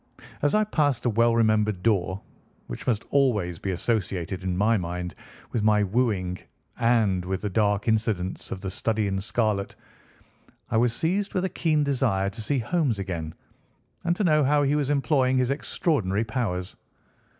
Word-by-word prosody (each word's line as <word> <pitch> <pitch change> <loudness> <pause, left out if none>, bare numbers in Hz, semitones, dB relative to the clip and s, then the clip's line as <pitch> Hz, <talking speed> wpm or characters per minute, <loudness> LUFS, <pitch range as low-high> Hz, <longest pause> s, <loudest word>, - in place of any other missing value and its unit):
As 145 +5 +2
I 215 - +4
passed 150 - 0
the 120 - +1
well 115 +1 +3
remembered 110 -4 +2
door, 100 -3 +1 0.4
which - - -8
must 115 -4 0
always 105 - +1
be 95 - -4
associated 95 -2 -2
in 90 -1 -1
my 110 +4 +3
mind 90 -2 -3 0.4
with 115 - -1
my 105 0 +3
wooing, 100 -4 0 0.4
and 110 -6 +2
with 95 +1 -2
the 105 - -3
dark 105 0 +1
incidents 110 -5 -1
of 95 - -5
the 95 -1 -4
Study 110 +2 0
in 95 -1 -1
Scarlet, 105 -2 -1 1.0
I - - +2
was 120 +1 +3
seized 190 - -1
with 185 0 +1
a - - -1
keen 160 -4 +1
desire 120 -9 +1
to 110 - -7
see 140 +6 0
Holmes 130 -1 0
again, 85 -5 -4 0.7
and 170 0 +1
to 205 - -1
know 155 -4 +4
how 145 +2 +3
he 140 +1 +2
was 145 -2 0
employing 135 -2 +2
his 130 0 +1
extraordinary 115 - 0
powers. 105 -6 -3
110 Hz, 170 wpm, -26 LUFS, 95-135 Hz, 1.0 s, I